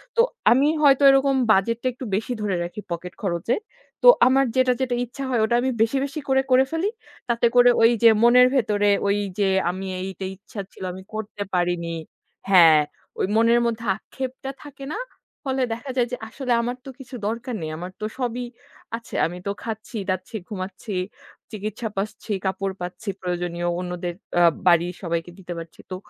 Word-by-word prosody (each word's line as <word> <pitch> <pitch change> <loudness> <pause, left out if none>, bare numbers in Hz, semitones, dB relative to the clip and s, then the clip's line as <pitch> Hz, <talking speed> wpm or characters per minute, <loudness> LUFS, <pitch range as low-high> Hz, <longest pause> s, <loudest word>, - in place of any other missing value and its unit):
তো 465 - +6 0.3
আমি 270 +4 +5
হয়তো 280 -1 +5
এরকম 270 0 +4 0.2
বাজেটটা 230 +5 +2
একটু 255 - -8
বেশি 225 +4 -2
ধরে 205 -3 0
রাখি 175 +5 -6
পকেট 175 +1 -4
খরচে। 180 +3 0 0.5
তো - - +7 0.2
আমার 270 +1 +4
যেটা, 255 -1 +4
যেটা 250 -2 0
ইচ্ছা 265 +3 -8
হয় 240 -3 +1
ওটা 235 - +1
আমি 260 +1 0
বেশি, 230 +4 +2
বেশি 280 +2 -5
করে 265 0 +4
করে 255 +1 +6
ফেলি। 330 +5 0 0.4
তাতে 235 0 +2
করে 245 0 +7
ঐযে 230 0 +6
মনের 250 +1 +7
ভেতরে 205 -5 +2 0.2
ঐযে 200 -1 0 0.2
আমি 185 +2 -4
এই 185 - -3
এইটা 190 0 -6
ইচ্ছা 200 +2 -11
ছিল - - -11
আমি 190 0 -9
করতে 215 -1 -6
পারিনি 175 -1 0 0.5
হ্যাঁ, 165 -5 +8 0.4
ঐ - - +1
মনের 230 +1 +5
মধ্যে 230 0 -2
আক্ষেপটা 265 +4 -6
থাকে 280 -2 -10
না। - - -3 0.5
ফলে 265 -1 0
দেখা 240 +5 -7
যায় 245 -1 +3
যে 250 - -2
আসলে 250 +2 -4
আমার 245 +1 -2
তো - - -7
কিছু 255 0 -9
দরকার 235 +3 -3
নেই। 155 - -3
আমার 180 +3 -6
তো - - -1
সবই 245 -1 -2 0.5
আছে। 230 - -11
আমি 175 +2 -4
তো 200 - +1
খাচ্ছি-দাচ্ছি, 215 -3 -4
ঘুমাচ্ছি, 195 +1 -6 0.6
চিকিৎসা 215 +2 -4
পাচ্ছি, 210 +2 -4
কাপড় 190 0 -1
পাচ্ছি 180 +4 -5
প্রয়োজনীয়। 175 -1 -2
অন্যদের 180 -1 -4 0.2
অ্যা 175 0 +5 0.2
বাড়ির 175 +1 +4
সবাইকে 170 -1 -3
দিতে 180 -2 -6
পারছি। 165 0 -9
তো 185 - -2
220 Hz, 170 wpm, -23 LUFS, 185-250 Hz, 0.6 s, হ্যাঁ